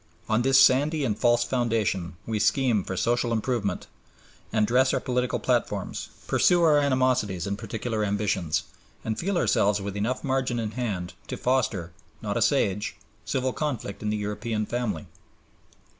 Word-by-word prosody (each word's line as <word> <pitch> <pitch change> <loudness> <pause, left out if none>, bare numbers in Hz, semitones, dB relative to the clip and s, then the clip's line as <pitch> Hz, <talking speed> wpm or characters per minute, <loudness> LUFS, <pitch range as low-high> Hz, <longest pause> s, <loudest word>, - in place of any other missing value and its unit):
On 110 +2 +2
this 135 +1 +5
sandy 145 +3 +4
and 110 -5 0
false 120 +2 +3
foundation 115 -8 -1
we 110 -2 -2
scheme 110 -1 +2
for 95 - -5
social 120 +2 +1
improvement 110 -3 -1 0.7
and 110 -1 +2
dress 130 +4 +3
our - - +1
political 125 -2 -1
platforms, - - -1 0.2
pursue 175 -1 +3
our 150 -3 +5
animosities 130 - +1
and 100 0 -2
particular 110 +1 -3
ambitions, 100 -5 0 0.4
and 110 -1 -2
feel 195 +1 0
ourselves 105 -9 +2
with 100 0 -5
enough 110 +5 -2
margin 130 -3 0
in 110 -2 -2
hand 100 -7 -3
to - - -4
foster, 110 -9 0 0.3
not - - -3
assuage, 100 +2 +1 0.3
civil 130 +4 -1
conflict 130 -9 -3
in 105 - -2
the 105 - 0
European 105 +1 -2
family. 110 -9 -3
115 Hz, 150 wpm, -26 LUFS, 105-130 Hz, 0.7 s, this